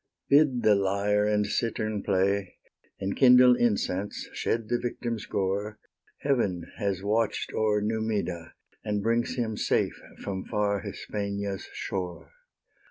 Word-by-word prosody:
Bid 140 -4 +4
the 105 - +6
lyre 100 +1 +1
and 105 0 +2
cittern 110 -1 -1
play; 100 -1 0 0.4
Enkindle 125 +5 +6
incense, 105 -4 -1
shed 115 -1 -1
the 120 +2 0
victim's 120 -2 -4
gore; 100 +2 -1 0.4
Heaven 100 - 0
has 100 -2 -1
watch'd 110 +1 0
o'er 105 -1 +1
Numida, 105 -6 -2 0.3
And 105 -1 -1
brings 115 +2 +1
him 115 -4 -1
safe - - 0 0.2
from 95 -2 -5
far 105 -2 0
Hispania's 100 0 -4
shore. 90 -2 -5
105 Hz, 115 wpm, -27 LUFS, 100-115 Hz, 0.4 s, the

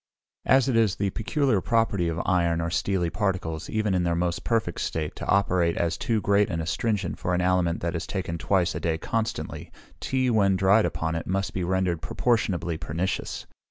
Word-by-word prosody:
As 135 0 +5
it 130 - +1
is 110 -4 +3
the 100 -1 -1
peculiar 115 - 0
property 110 -6 +1
of 85 0 -2
iron 85 -2 +2
or 85 0 -2
steely 85 +1 0
particles, 90 -5 -2
even 110 -2 0
in 90 - +2
their 85 -1 +1
most 85 0 -1
perfect 110 -8 -1
state, 80 -2 -3
to - - -6
operate 90 -4 +2
as 85 -1 0
too 110 +5 0
great 100 0 +2
an 80 - -2
astringent 100 +3 -1
for 90 - 0
an 90 - +1
aliment 90 -2 +1
that 85 +1 -2
is 85 - -4
taken 90 -4 -3
twice 90 +1 +1
a - - -3
day 80 -1 -1
constantly, 115 +7 -3 0.3
tea, 130 -1 0
when 100 -4 +3
dried 100 +3 +4
upon 80 0 -2
it, 80 - -4
must 95 +1 -1
be 95 - -2
rendered 90 -2 0
proportionably 90 -10 0
pernicious. 85 +3 -3
90 Hz, 195 wpm, -26 LUFS, 85-105 Hz, 0.3 s, As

